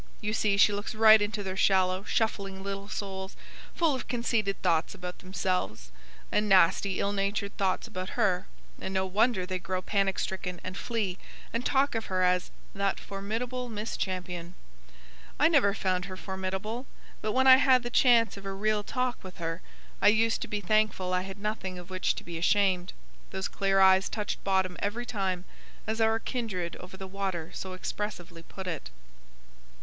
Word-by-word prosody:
You 210 Hz, 0 st, -2 dB
see 210 Hz, -2 st, +2 dB
she 205 Hz, +1 st, +6 dB
looks 205 Hz, +3 st, -4 dB
right 220 Hz, 0 st, +8 dB
into 205 Hz, 0 st, -1 dB
their 190 Hz, -1 st, -4 dB
shallow 185 Hz, -1 st, +3 dB
shuffling 200 Hz, -3 st, -1 dB
little 200 Hz, 0 st, -5 dB
souls, 190 Hz, -2 st, -5 dB, 0.4 s
full 330 Hz, -4 st, +3 dB
of 260 Hz, -, -4 dB
conceited 230 Hz, -5 st, 0 dB
thoughts 165 Hz, -1 st, +1 dB
about 180 Hz, 0 st, -7 dB
themselves, 185 Hz, -, -2 dB, 0.4 s
and 210 Hz, 0 st, +1 dB
nasty 190 Hz, +1 st, +4 dB
ill 200 Hz, +1 st, 0 dB
natured 200 Hz, 0 st, -1 dB
thoughts 190 Hz, -2 st, 0 dB
about 185 Hz, +4 st, -6 dB
her; 190 Hz, -6 st, +2 dB, 0.3 s
and 190 Hz, -, -4 dB
no 190 Hz, 0 st, +2 dB
wonder 200 Hz, +1 st, +2 dB
they 185 Hz, 0 st, -3 dB
grow 185 Hz, +1 st, -2 dB
panic 195 Hz, 0 st, 0 dB
stricken, 180 Hz, -2 st, -3 dB
and 185 Hz, +1 st, -5 dB
flee; 205 Hz, -5 st, -2 dB, 0.3 s
and 230 Hz, +1 st, -1 dB
talk 275 Hz, +1 st, +2 dB
of 225 Hz, -1 st, -3 dB
her 185 Hz, -1 st, +1 dB
as 180 Hz, 0 st, +2 dB, 0.2 s
'that 200 Hz, -1 st, 0 dB
formidable 235 Hz, +6 st, -4 dB
Miss 215 Hz, 0 st, -4 dB
Champion.' 180 Hz, -2 st, -4 dB, 0.8 s
I 300 Hz, -, +6 dB
never 285 Hz, -11 st, +4 dB
found 185 Hz, -1 st, 0 dB
her 185 Hz, 0 st, -7 dB
formidable; 190 Hz, +6 st, -4 dB, 0.3 s
but, 215 Hz, 0 st, -1 dB
when 260 Hz, +1 st, +3 dB
I 260 Hz, -1 st, +10 dB
had 260 Hz, -2 st, +5 dB
the 240 Hz, -, -4 dB
chance 235 Hz, -4 st, +4 dB
of 200 Hz, -, -10 dB
a 195 Hz, -, -3 dB
real 210 Hz, +2 st, +1 dB
talk 250 Hz, +2 st, -2 dB
with 185 Hz, -1 st, -10 dB
her, 165 Hz, +1 st, -3 dB, 0.4 s
I -, -, +5 dB
used 225 Hz, +2 st, +4 dB
to -, -, -3 dB
be 210 Hz, -1 st, -3 dB
thankful 200 Hz, -2 st, +1 dB
I 180 Hz, -, +2 dB
had 190 Hz, +1 st, -7 dB
nothing 200 Hz, -3 st, -3 dB
of 180 Hz, +1 st, -10 dB
which 185 Hz, 0 st, 0 dB
to -, -, -7 dB
be 170 Hz, -1 st, -6 dB
ashamed. 185 Hz, 0 st, +2 dB, 0.4 s
Those 190 Hz, 0 st, -3 dB
clear 195 Hz, -1 st, +1 dB
eyes 190 Hz, 0 st, +6 dB
touched 210 Hz, -2 st, -3 dB
bottom 190 Hz, -2 st, +1 dB
every 225 Hz, +4 st, -2 dB
time, 190 Hz, -6 st, -2 dB, 0.4 s
as 220 Hz, +1 st, -2 dB
our 225 Hz, 0 st, +4 dB
kindred 215 Hz, -8 st, -3 dB
over 180 Hz, +1 st, -11 dB
the 190 Hz, -, -7 dB
water 190 Hz, -4 st, -3 dB
so 190 Hz, -1 st, -5 dB
expressively 185 Hz, -3 st, -5 dB
put 190 Hz, +3 st, -9 dB
it." 165 Hz, -, -4 dB
195 Hz, 180 wpm, -29 LUFS, 185-215 Hz, 0.8 s, I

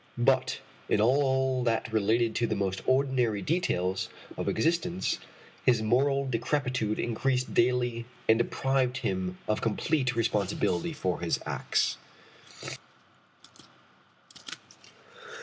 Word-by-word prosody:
But 130 Hz, +2 st, +2 dB, 0.3 s
in -, -, +3 dB
all 130 Hz, +1 st, +2 dB
that 115 Hz, -1 st, 0 dB
related 110 Hz, +2 st, +2 dB
to 120 Hz, -, +1 dB
the -, -, -1 dB
most 95 Hz, -1 st, -1 dB
ordinary 130 Hz, -6 st, +2 dB
details 95 Hz, -, 0 dB, 0.3 s
of -, -, -2 dB
existence 170 Hz, +2 st, 0 dB, 0.4 s
his 120 Hz, -3 st, +3 dB
moral 135 Hz, +5 st, +2 dB
decrepitude 125 Hz, -3 st, -1 dB
increased 125 Hz, +2 st, -1 dB
daily 120 Hz, -1 st, +1 dB, 0.2 s
and 110 Hz, +1 st, +5 dB
deprived 130 Hz, +1 st, +1 dB
him 95 Hz, -1 st, -1 dB
of 110 Hz, -, 0 dB
complete 125 Hz, +3 st, 0 dB
responsibility 105 Hz, -, 0 dB
for 95 Hz, -11 st, -2 dB
his 85 Hz, -1 st, 0 dB
acts. -, -, 0 dB
120 Hz, 100 wpm, -29 LUFS, 110-130 Hz, 0.4 s, and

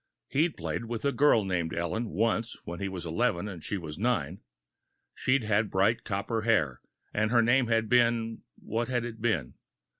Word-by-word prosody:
He'd 155 Hz, +3 st, +1 dB
played 80 Hz, +6 st, -3 dB
with 115 Hz, +2 st, -4 dB
a 140 Hz, -, +3 dB
girl 135 Hz, -7 st, +4 dB
named 85 Hz, -4 st, -1 dB
Ellen, 85 Hz, +7 st, -2 dB
once 115 Hz, +2 st, 0 dB
when 85 Hz, 0 st, -6 dB
he 100 Hz, -, -2 dB
was 90 Hz, -2 st, -6 dB
eleven 95 Hz, +2 st, 0 dB
and 90 Hz, -6 st, -8 dB
she 100 Hz, -, -2 dB
was 80 Hz, -2 st, -7 dB
nine. 100 Hz, -, 0 dB, 0.7 s
She'd 130 Hz, -1 st, +1 dB
had 105 Hz, 0 st, +1 dB
bright 100 Hz, +5 st, +2 dB
copper 110 Hz, +2 st, -2 dB
hair, 90 Hz, -, +1 dB, 0.3 s
and 110 Hz, +1 st, +1 dB
her 120 Hz, 0 st, +4 dB
name 120 Hz, +1 st, +3 dB
had 115 Hz, -1 st, +2 dB
been 115 Hz, -1 st, +2 dB
what 115 Hz, +1 st, -3 dB
had 120 Hz, -1 st, -1 dB
it 115 Hz, -2 st, -7 dB
been? 95 Hz, -, 0 dB
110 Hz, 180 wpm, -29 LUFS, 95-120 Hz, 0.7 s, girl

